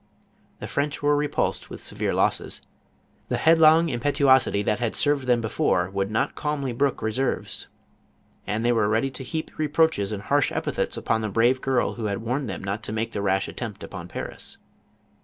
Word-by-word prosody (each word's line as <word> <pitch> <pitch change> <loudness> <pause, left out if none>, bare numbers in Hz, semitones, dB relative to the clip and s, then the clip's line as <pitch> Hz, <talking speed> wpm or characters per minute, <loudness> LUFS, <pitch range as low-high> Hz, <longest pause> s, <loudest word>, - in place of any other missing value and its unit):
The - - -6
French 145 +1 -2
were 145 0 +4
repulsed 145 0 -1
with - - -8
severe - - -3
losses. - - 0 0.7
The - - 0
headlong 160 0 +6
im 120 -4 -2
petuosity 130 -6 +3
that 105 - +1
had 120 -2 -1
served 145 -3 +1
them 120 -2 +3
before, 95 -4 0
would 100 0 -1
not 110 - 0
calmly 145 -3 -2
brook 135 +2 0
reverse?, 110 +5 -2 0.8
and 110 +3 -1
they 120 - +4
were 110 -3 +2
ready 115 +5 +1
to 130 +1 -6
heap 155 +5 -4
reproaches 155 -8 +2
and 100 -1 -4
harsh 145 +3 +2
epithets - - -2
upon 110 0 0
the 110 - -2
brave 120 +5 +2
girl 130 -2 +1
who 115 - -5
had 100 -1 -1
warned 125 +2 -2
them 95 - -5
not 100 +3 -3
to - - -4
make 110 +1 -2
the 100 - -3
rash 95 -1 +1
attempt 110 -5 -6
upon 90 -3 -7
Paris. - - -7
120 Hz, 185 wpm, -25 LUFS, 105-145 Hz, 0.8 s, headlong